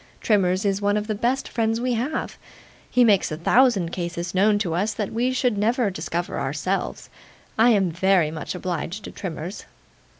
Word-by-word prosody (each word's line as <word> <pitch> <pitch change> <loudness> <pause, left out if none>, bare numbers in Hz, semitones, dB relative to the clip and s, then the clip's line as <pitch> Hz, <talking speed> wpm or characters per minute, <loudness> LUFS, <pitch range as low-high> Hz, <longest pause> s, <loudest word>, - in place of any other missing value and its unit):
Trimmers 190 -3 +2
is 200 0 0
one 205 +1 +2
of 210 - -2
the 215 - -2
best 245 +6 -1
friends 225 -1 0
we 250 +1 0
have. 250 +7 -3 0.5
He 250 - +4
makes 205 -8 +3
a 155 - -3
thousand 200 -1 +3
cases 170 -1 -4
known 205 +3 +3
to 190 -6 -1
us 200 +6 -1
that 210 -2 -3
we 245 +3 +1
should 250 -4 0
never 225 0 +1
discover 170 0 -3
of - - -2
ourselves. 150 +8 -3 0.4
I 225 +2 +5
am 195 -6 +3
VERY 180 -2 +2
much 155 +2 -5
obliged 180 +2 -4
to - - -8
Trimmers. 175 +1 -6
200 Hz, 185 wpm, -23 LUFS, 175-225 Hz, 0.5 s, I